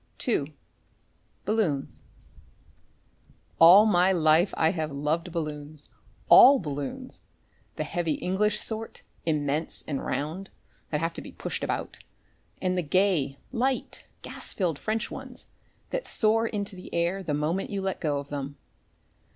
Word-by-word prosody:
II: 150 - 0 0.9
BALLOONS 190 -10 0 1.6
All 180 +6 +9
my 185 -3 +4
life 165 +1 +4
I 160 0 +3
have 160 -4 -3
loved 150 +5 -1
balloons 150 -2 -5 0.4
all 275 +2 +9
balloons 155 - -5 0.5
the - - -2
heavy 170 -3 -1
English 200 +6 0
sort, 225 0 -4 0.2
immense 150 0 -1
and 140 -3 -3
round, 165 +7 -3 0.4
that 150 -1 -1
have 165 0 -1
to - - -6
be - - -10
pushed - - -5
about, - - -3 0.6
and 185 0 0
the 180 - +1
gay, 160 -5 +1
light, 260 +1 -2 0.2
gas - - -5
filled 170 -7 -1
French 220 +1 -2
ones - - -7 0.5
that - - -3
soar 225 +1 +2
into 200 -3 -4
the 180 - -11
air 170 +3 0
the 160 -6 -2
moment 160 +6 -1
you 200 - -3
let 190 0 -2
go 150 -3 0
of 140 0 -6
them. 140 0 -5
170 Hz, 135 wpm, -27 LUFS, 150-200 Hz, 1.6 s, All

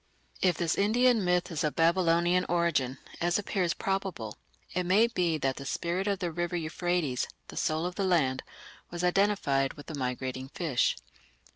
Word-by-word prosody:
If 180 -3 +3
this 170 -2 +1
Indian 230 +2 +4
myth 180 -1 +1
is 160 -1 -2
of 150 - 0
Babylonian 170 +1 +3
origin, 170 -7 +1 0.2
as 175 +1 +2
appears 190 -4 -1
probable, 190 - -3 0.4
it 180 - 0
may 190 +6 +4
be 180 -8 0
that 135 -3 -1
the 140 - -6
spirit 175 +6 -1
of 200 -1 +1
the 175 -2 -3
river 175 +2 -2
Euphrates, 165 -4 -1 0.2
"the - - -9
soul 155 +1 0
of 180 - -2
the 200 - -2
land", 155 -9 +2 0.5
was 175 0 -5
identified 180 -8 +2
with 145 +2 -9
a - - -4
migrating 130 0 -3
fish. 155 -8 +1
175 Hz, 165 wpm, -29 LUFS, 150-185 Hz, 0.5 s, Indian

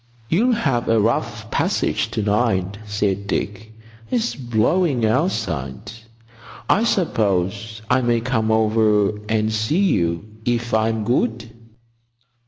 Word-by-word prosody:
"You'll 240 +9 +3
have 135 - 0
a 115 0 +4
rough 110 +3 -1
passage - - 0
to 110 - -2
night," 100 -2 0
said 100 -1 -1
Dick. 105 +2 -3 0.4
"It's 240 -1 0
blowing 125 +3 +1
outside. 110 - -1 0.8
I 220 - +3
suppose 110 - 0
I 125 +2 +3
may 120 -1 +2
come 115 -2 -1
over 110 -2 +2
and 110 0 +1
see 110 +9 0 0.2
you 85 +2 -1 0.2
if 120 -1 -1
I'm 110 0 +1
good?" 115 0 -1
110 Hz, 115 wpm, -21 LUFS, 105-120 Hz, 0.8 s, a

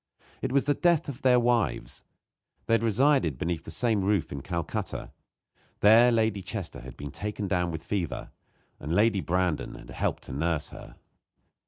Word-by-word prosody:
It - - -2
was 140 0 +3
the 145 - +2
death 170 0 +2
of 135 - -7
their 125 -1 +5
wives. 120 - 0 0.6
They - - +1
had 115 - +4
resided 115 - +2
beneath 85 +1 -3
the - - -8
same 110 +5 +1
roof 100 -2 +1
in 70 - -5
Calcutta. 85 +2 -4 0.7
There 115 +4 +7
Lady 110 -3 +1
Chester 95 -2 -6
had 65 0 -11
been 70 -1 -7
taken 105 +4 -4
down 90 -2 0
with 80 -1 -5
fever, 90 -1 -3 0.5
and 75 +5 -3
Lady 105 -1 +3
Brandon 90 -3 -1
had - - -12
helped - - -2
to - - -8
nurse 80 +1 -1
her. - - -12
100 Hz, 170 wpm, -28 LUFS, 85-115 Hz, 0.7 s, There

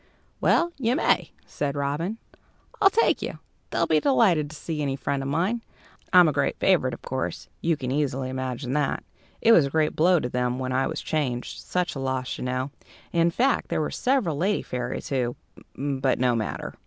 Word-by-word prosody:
"Well, 345 0 +3
you 245 0 +1
may," - - +2 0.2
said 145 -1 -3
Robin; 145 +9 -2 0.6
"I'll 395 - +8
take 455 +4 +2
you. - - -4 0.3
They'll - - +1
be - - +3
delighted 195 - +3
to 155 - -10
see 155 0 -4
any 140 -2 -1
friend 140 0 -2
of 135 - -3
mine, 185 +11 0 0.5
I'm 180 -2 +8
a - - +3
great - - 0
favourite; - - +2
of - - -18
course, - - -4
you 165 -2 +1
can 130 -3 -3
easily 135 -2 -1
imagine 130 0 -3
that. 145 -1 0 0.4
It 230 - +5
was 165 -11 +6
a - - -4
great 155 +1 +1
blow 175 +2 +4
to 125 - -2
them 125 0 -1
when 130 0 -3
I 130 +1 +1
was 160 - -4
changed; 130 -6 -2
such 180 0 -2
a 135 - -6
loss, 130 -1 -2
you - - -4
know. 130 +2 -2 0.4
In 170 0 +4
fact, 255 +10 +1
there - - 0
were 155 - -1
several 250 - +1
lady 195 +6 +1
fairies, 125 0 -4
who 125 -3 0 0.4
but 135 -1 0
no 125 -1 +2
matter." 110 -2 -3
145 Hz, 195 wpm, -25 LUFS, 130-175 Hz, 0.6 s, I'll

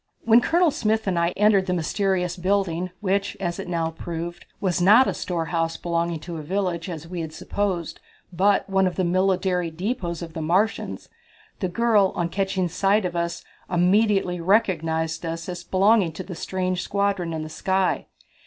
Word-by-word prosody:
When 230 +1 +6
Colonel 335 +3 +3
Smith 220 -3 0
and 185 -3 0
I 170 0 +2
entered 205 -2 +4
the 180 - +1
mysterious 180 +1 0
building 185 -1 0
which, 200 0 0
as 175 -3 -3
it - - -5
now 165 -2 -1
proved, 170 +1 -6
was 180 -3 0
not 215 +8 +7
a - - 0
storehouse 165 -1 -2
belonging 170 -1 -1
to 170 0 -6
a - - -5
village, 180 +1 -2
as 165 -2 -6
we 175 0 -4
had 160 -1 -5
supposed, 175 -1 -3 0.3
but 195 +3 +2
one 190 -1 +2
of 180 - -3
the 185 - 0
military 185 -1 +1
depots 175 -1 -3
of 165 -1 -8
the 160 - -4
Martians, 185 +8 0 0.5
the 185 - -1
girl, 210 -1 +3
on 170 -1 -1
catching 190 -1 -1
sight 195 +4 +1
of 175 -1 -3
us, 170 0 -2 0.3
immediately 185 0 +2
recognized 165 -4 +1
us 165 0 -4
as 175 -1 -5
belonging 195 -2 +3
to 185 - -6
the 185 - -8
strange 185 +1 -2
squadron 200 -4 -1
in 160 -1 -3
the - - -6
sky. 190 +4 0
180 Hz, 175 wpm, -24 LUFS, 170-195 Hz, 0.5 s, not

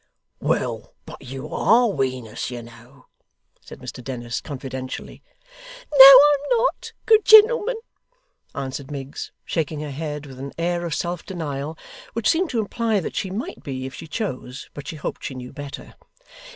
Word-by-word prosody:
'Well, - - -2
but - - -11
you 130 +1 -8
ARE 240 +3 +4
Wenus, 130 - -3
you 120 -2 -6
know,' 120 +3 -16 0.6
said - - -11
Mr 125 - -9
Dennis, 120 -2 -4
confidentially. 130 -2 -7 0.7
'No, 285 - +1
I 280 +2 +10
am 470 +12 +1
not, - - -1
good 440 -1 +5
gentleman,' 440 +2 +7 0.8
answered 135 0 -5
Miggs, 140 -1 -6
shaking 155 -2 -2
her 150 -1 -5
head 150 0 -5
with 130 -2 -11
an 140 +1 -7
air 175 +1 -1
of 160 - -2
self 175 -1 -3
denial 155 -4 -5 0.4
which 230 -2 -1
seemed 340 +1 +2
to 240 - -1
imply 220 0 0
that 175 - -5
she 190 - -2
might 200 +5 -5
be 130 -2 -5
if 135 - -7
she 165 - -9
chose, 135 - -5
but 145 - -9
she - - -5
hoped 150 - -5
she 135 - -5
knew 125 -1 -8
better. 145 -2 -8
150 Hz, 165 wpm, -23 LUFS, 130-215 Hz, 0.8 s, I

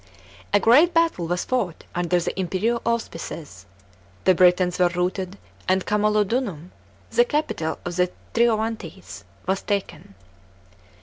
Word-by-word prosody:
A 205 - +5
great 300 - +5
battle 330 - +2
was 175 +1 -1
fought 205 -10 -2
under 175 0 +1
the 175 - -3
imperial 195 +6 0
auspices; 165 - -4 0.6
the 185 - +5
Britons 180 0 +3
were 180 - +5
routed 180 +2 -2 0.3
and 185 0 +2
Camnlodunum, 210 - 0 0.4
the 480 - +5
capital 295 - -2
of 175 0 -4
the 180 0 +3 0.2
Trino 235 -1 +4
vantes, 225 +1 -6 0.2
was 190 +1 0
taken. 200 - -4
190 Hz, 125 wpm, -23 LUFS, 180-230 Hz, 0.6 s, A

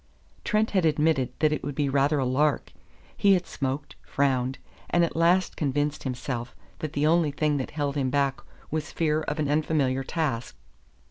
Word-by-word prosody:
Trent 215 +1 +1
had 190 -3 +2
admitted 150 -4 +2
that 155 -1 +4
it 150 - -3
would 145 - -4
be 145 0 +1
rather 140 +2 +2
a 135 - +1
lark; 140 +3 +1 0.4
he 200 -1 +4
had 180 -1 -1
smoked, 135 0 -4
frowned, 130 -2 0 0.3
and 175 -1 +3
at - - -6
last 175 +3 +3
convinced 145 0 -1
himself 125 -1 -4 0.2
that 155 -1 -4
the 145 0 +1
only 165 0 +3
thing 150 0 0
that 130 - -3
held 145 -2 -2
him 135 -3 0
back 140 0 +1 0.3
was 155 0 -3
fear 155 -1 +1
of 150 -1 -3
an 155 -2 0
unfamiliar 145 -3 +1
task. 135 - -2
145 Hz, 180 wpm, -26 LUFS, 135-155 Hz, 0.4 s, that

